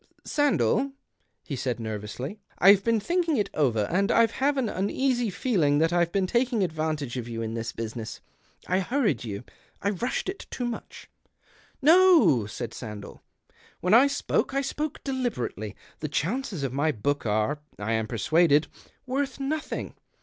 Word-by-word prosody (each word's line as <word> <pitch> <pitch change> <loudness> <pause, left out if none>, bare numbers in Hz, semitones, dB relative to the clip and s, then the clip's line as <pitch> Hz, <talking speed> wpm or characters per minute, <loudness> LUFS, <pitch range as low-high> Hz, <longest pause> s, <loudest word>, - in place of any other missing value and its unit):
" - - -39
Sandell," 280 -2 +2 0.5
he 145 - -5
said 125 -2 -2
nervously, 110 - -5
" - - -33
I've 195 +1 +7
been 230 0 +2
thinking 335 - +1
it 205 - 0
over, 125 -8 +2
and 195 +3 +2
I've 230 -1 +4
have 280 +3 +1
an 260 -4 +1
uneasy 240 +5 0
feeling 180 - +1
that 165 +3 +2
I've 170 -1 +2
been 195 0 +1
taking 240 +1 +1
advantage 155 -6 -2
of 120 -2 -4
you 115 -1 -3
in 110 0 -4
this 115 0 -3
business. 115 0 -6 0.5
I 185 +1 +2
hurried 200 - 0
you. 105 -1 -5 0.4
I 200 - 0
rushed 235 +6 -2
it 380 +1 -5
too 245 - -3
much." 240 -1 -6 0.8
"No," 325 - +6
said 115 +2 -5
Sandell. 105 -3 -8 0.6
"When 180 +3 +1
I 250 +5 +8
spoke, 275 -1 -1
I 275 - +2
spoke 295 +2 -4
deliberately. 235 - -3 0.2
The 155 - -3
chances 185 - -2
of 130 -2 -2
my 145 +3 +2
book 140 +2 -1
are, 110 +8 +1 0.2
I 105 +2 -3
am 110 -1 0
persuaded, 150 +6 +3 0.4
worth 270 +1 -2
nothing. 300 +3 -3
175 Hz, 165 wpm, -27 LUFS, -, 0.8 s, I